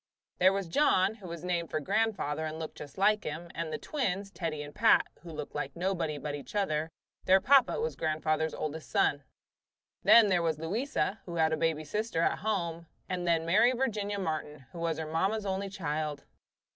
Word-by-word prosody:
There 185 Hz, +1 st, +6 dB
was 195 Hz, -2 st, -2 dB
John, 190 Hz, -, +3 dB
who 205 Hz, -4 st, -11 dB
was 170 Hz, -1 st, -7 dB
named 175 Hz, -2 st, -1 dB
for 155 Hz, -, -1 dB
grandfather 190 Hz, -4 st, 0 dB
and 155 Hz, 0 st, -4 dB
looked 160 Hz, -1 st, -7 dB
just 145 Hz, -2 st, -10 dB
like 210 Hz, +2 st, +3 dB
him, 165 Hz, +3 st, -6 dB
and 165 Hz, -1 st, -4 dB
the 155 Hz, -, -2 dB
twins, 200 Hz, -9 st, -2 dB
Teddie 165 Hz, -5 st, -3 dB
and 145 Hz, 0 st, -10 dB
Pat, 225 Hz, +1 st, +5 dB, 0.2 s
who 170 Hz, -, -11 dB
looked 150 Hz, -2 st, -6 dB
like 145 Hz, -2 st, -4 dB
nobody 170 Hz, -4 st, -1 dB
but 145 Hz, 0 st, -4 dB
each 145 Hz, +7 st, -8 dB
other; 160 Hz, -6 st, 0 dB, 0.4 s
their 190 Hz, +1 st, +6 dB
papa 265 Hz, +3 st, +4 dB
was 470 Hz, +1 st, -2 dB
grandfather's 155 Hz, 0 st, 0 dB
oldest 155 Hz, +1 st, -5 dB
son. 145 Hz, -, +2 dB, 0.8 s
Then 225 Hz, -3 st, +7 dB
there 180 Hz, -2 st, +3 dB
was 160 Hz, -2 st, 0 dB
Louisa, 205 Hz, -, -1 dB
who 170 Hz, -, -5 dB
had 160 Hz, -1 st, +2 dB
a -, -, +3 dB
baby 160 Hz, -1 st, 0 dB
sister 190 Hz, +1 st, -1 dB
at -, -, +1 dB
home, 170 Hz, -6 st, -2 dB, 0.2 s
and 180 Hz, -1 st, -3 dB
then 165 Hz, -1 st, +2 dB
Mary 215 Hz, +9 st, +4 dB
Virginia 210 Hz, -5 st, -1 dB
Martin, 155 Hz, -6 st, -4 dB
who 170 Hz, -, -9 dB
was 165 Hz, -2 st, -1 dB
her 160 Hz, -, -3 dB
mamma's 190 Hz, +7 st, 0 dB
only 195 Hz, 0 st, -2 dB
child. 155 Hz, -6 st, -3 dB
170 Hz, 195 wpm, -30 LUFS, 155-200 Hz, 0.8 s, Then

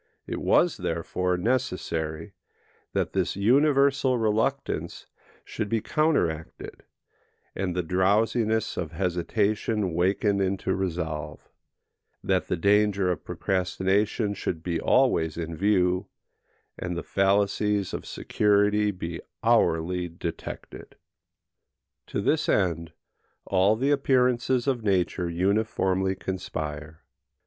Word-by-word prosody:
It -, -, -4 dB
was, -, -, +3 dB
therefore, 90 Hz, 0 st, -1 dB
necessary 90 Hz, -6 st, -2 dB, 0.6 s
that -, -, -1 dB
this -, -, 0 dB
universal 135 Hz, +4 st, +3 dB
reluctance 115 Hz, +5 st, -1 dB, 0.4 s
should 110 Hz, -2 st, -4 dB
be 115 Hz, -, +1 dB
counteracted, 105 Hz, -, -1 dB, 0.7 s
and 90 Hz, -2 st, -3 dB
the 90 Hz, -, 0 dB
drowsiness 110 Hz, +5 st, +1 dB
of 85 Hz, -2 st, -4 dB
hesitation 100 Hz, +3 st, 0 dB
wakened 100 Hz, +3 st, +1 dB
into 95 Hz, 0 st, 0 dB
resolve; 80 Hz, -5 st, -4 dB, 0.8 s
that 95 Hz, -1 st, 0 dB
the 90 Hz, -, -1 dB
danger 100 Hz, 0 st, +3 dB
of 90 Hz, -, -4 dB
procrastination 95 Hz, +4 st, 0 dB
should 85 Hz, -4 st, -4 dB
he 85 Hz, -2 st, -1 dB
always 85 Hz, -, +2 dB
in 85 Hz, -1 st, -4 dB
view, 90 Hz, 0 st, +1 dB, 0.7 s
and 90 Hz, -1 st, -3 dB
the -, -, -4 dB
fallacies 100 Hz, 0 st, +1 dB
of -, -, -5 dB
security 105 Hz, 0 st, +2 dB
be 85 Hz, -4 st, -5 dB, 0.2 s
hourly 90 Hz, +2 st, +2 dB
detected. 85 Hz, 0 st, -7 dB, 1.1 s
To -, -, -2 dB
this -, -, +1 dB
end 85 Hz, -3 st, +1 dB, 0.5 s
all 95 Hz, +3 st, +3 dB
the 135 Hz, +5 st, +1 dB
appearances 125 Hz, -3 st, +2 dB
of 130 Hz, -4 st, 0 dB
nature 90 Hz, -3 st, 0 dB
uniformly 95 Hz, +1 st, 0 dB
conspire. 80 Hz, -5 st, -5 dB
95 Hz, 105 wpm, -26 LUFS, 90-110 Hz, 1.1 s, was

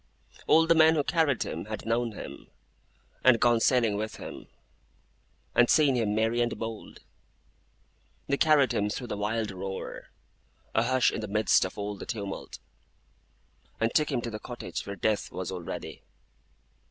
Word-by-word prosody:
All 160 Hz, +1 st, +6 dB
the 165 Hz, -, +5 dB
men 160 Hz, 0 st, +6 dB
who 150 Hz, -, +2 dB
carried 155 Hz, -5 st, +1 dB
him -, -, -5 dB
had 110 Hz, 0 st, -6 dB
known 115 Hz, 0 st, 0 dB
him, -, -, -9 dB, 0.7 s
and 125 Hz, -3 st, +6 dB
gone 120 Hz, -1 st, +4 dB
sailing 115 Hz, -3 st, +2 dB
with 110 Hz, +1 st, -4 dB
him, -, -, -9 dB, 1.1 s
and 120 Hz, 0 st, +4 dB
seen 150 Hz, -3 st, +5 dB
him 110 Hz, -4 st, 0 dB
merry 115 Hz, +2 st, +1 dB
and 120 Hz, 0 st, -1 dB
bold. 115 Hz, -1 st, -7 dB, 1.2 s
They 140 Hz, -, 0 dB
carried 150 Hz, -5 st, +4 dB
him 105 Hz, 0 st, 0 dB
through 125 Hz, +4 st, -4 dB
the 120 Hz, -, -4 dB
wild 110 Hz, +1 st, -1 dB
roar, 95 Hz, 0 st, -6 dB, 0.7 s
a -, -, +3 dB
hush 130 Hz, -1 st, +3 dB
in -, -, -4 dB
the 110 Hz, -, -4 dB
midst 105 Hz, -1 st, +3 dB
of 95 Hz, -, -7 dB
all 105 Hz, 0 st, -3 dB
the -, -, -9 dB
tumult; 100 Hz, -5 st, -5 dB, 1.2 s
and 115 Hz, 0 st, 0 dB
took 150 Hz, -1 st, +2 dB
him 125 Hz, -3 st, 0 dB
to 115 Hz, -, -5 dB
the 105 Hz, -, -5 dB
cottage 110 Hz, -9 st, -6 dB
where 100 Hz, -, -4 dB
Death 105 Hz, +3 st, -1 dB
was 95 Hz, 0 st, -5 dB
already. 90 Hz, -3 st, -6 dB
115 Hz, 165 wpm, -28 LUFS, 105-130 Hz, 1.2 s, All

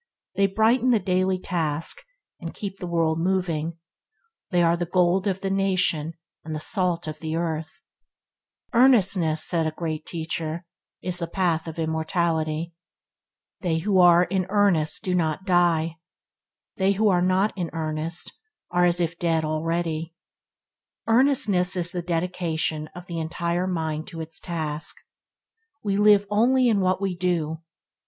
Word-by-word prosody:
They 195 Hz, +1 st, +3 dB
brighten 225 Hz, +6 st, +2 dB
the 240 Hz, -, +5 dB
daily 185 Hz, -1 st, +1 dB
task, 165 Hz, -4 st, -1 dB, 0.4 s
and -, -, -7 dB
keep 195 Hz, -2 st, -6 dB
the 180 Hz, -, -5 dB
world 165 Hz, -2 st, +1 dB
moving. 170 Hz, -3 st, -1 dB, 0.7 s
They 175 Hz, -3 st, +2 dB
are 170 Hz, 0 st, +4 dB
the 175 Hz, 0 st, -3 dB
gold 180 Hz, +2 st, +2 dB
of 190 Hz, -1 st, -1 dB
the 195 Hz, -, -2 dB
nation 185 Hz, -5 st, +1 dB, 0.3 s
and 155 Hz, 0 st, -5 dB
the -, -, -3 dB
salt 175 Hz, -1 st, -1 dB
of 155 Hz, 0 st, -6 dB
the 160 Hz, 0 st, -3 dB
earth. 160 Hz, -1 st, -3 dB, 0.9 s
"Earnestness", 195 Hz, -11 st, +4 dB
said 165 Hz, -2 st, 0 dB
a -, -, -1 dB
Great 160 Hz, -2 st, -4 dB
Teacher, 160 Hz, 0 st, -4 dB, 0.4 s
"is 180 Hz, -1 st, -2 dB
the 170 Hz, -, -3 dB
path 170 Hz, -3 st, 0 dB
of 160 Hz, -, -7 dB
immortality. 160 Hz, 0 st, -1 dB, 0.9 s
They 170 Hz, -4 st, 0 dB
who 190 Hz, +3 st, +1 dB
are 175 Hz, -1 st, +7 dB
in 185 Hz, 0 st, -1 dB
earnest 195 Hz, -6 st, +2 dB
do 185 Hz, -3 st, -1 dB
not 165 Hz, +1 st, 0 dB
die; 170 Hz, -3 st, +2 dB, 0.8 s
they 195 Hz, +1 st, +3 dB
who 210 Hz, +2 st, +2 dB
are 180 Hz, -2 st, +3 dB
not 185 Hz, +3 st, +2 dB
in 175 Hz, -4 st, -3 dB
earnest 160 Hz, +1 st, -4 dB, 0.4 s
are 175 Hz, 0 st, +3 dB
as 175 Hz, 0 st, +2 dB
if 170 Hz, 0 st, -2 dB
dead 165 Hz, -2 st, +1 dB
already". 165 Hz, +1 st, -2 dB, 0.9 s
Earnestness 225 Hz, -7 st, +3 dB
is 175 Hz, -1 st, +2 dB
the 175 Hz, -, -3 dB
dedication 165 Hz, -2 st, -2 dB
of 180 Hz, 0 st, -9 dB
the 170 Hz, -2 st, -5 dB
entire 170 Hz, +2 st, -2 dB
mind 160 Hz, -3 st, -2 dB
to 165 Hz, -, -8 dB
its 160 Hz, 0 st, -5 dB
task. 160 Hz, -3 st, -4 dB, 0.9 s
We 200 Hz, -2 st, 0 dB
live 205 Hz, 0 st, +5 dB
only 245 Hz, +4 st, +4 dB
in 210 Hz, -3 st, +2 dB
what 185 Hz, 0 st, +1 dB
we 195 Hz, -2 st, -1 dB
do. 170 Hz, -3 st, -1 dB
175 Hz, 150 wpm, -24 LUFS, 160-190 Hz, 0.9 s, are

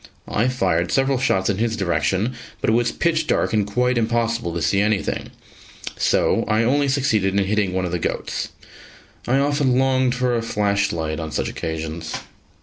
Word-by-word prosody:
I 115 Hz, +4 st, +1 dB
fired 90 Hz, -9 st, 0 dB
several 135 Hz, -1 st, +2 dB
shots 95 Hz, -7 st, +1 dB
in 100 Hz, -1 st, 0 dB
his 115 Hz, -1 st, 0 dB
direction, 95 Hz, +4 st, 0 dB, 0.3 s
but -, -, +1 dB
it -, -, +2 dB
was 120 Hz, +1 st, +2 dB
pitch 160 Hz, -2 st, 0 dB
dark -, -, +1 dB
and 105 Hz, -2 st, +2 dB
quite 125 Hz, +3 st, +1 dB
impossible 115 Hz, -3 st, 0 dB
to -, -, -1 dB
see 100 Hz, +4 st, +2 dB
anything, 105 Hz, -1 st, -1 dB, 0.7 s
so -, -, +2 dB
I 110 Hz, +1 st, +2 dB
only 140 Hz, +4 st, +2 dB
succeeded 110 Hz, -8 st, +1 dB
in 100 Hz, -, +1 dB
hitting 100 Hz, -1 st, +1 dB
one 95 Hz, 0 st, -1 dB
of 90 Hz, -, -3 dB
the 90 Hz, -, -1 dB
goats. -, -, -3 dB, 0.8 s
I 130 Hz, -, +3 dB
often 140 Hz, -2 st, +2 dB
longed 130 Hz, -1 st, +2 dB
for 125 Hz, -1 st, +1 dB
a 115 Hz, -, 0 dB
flash 100 Hz, -2 st, 0 dB
light 80 Hz, -2 st, -3 dB
on 80 Hz, -1 st, -5 dB
such -, -, -1 dB
occasions. 80 Hz, 0 st, -4 dB
110 Hz, 180 wpm, -22 LUFS, 95-125 Hz, 0.8 s, I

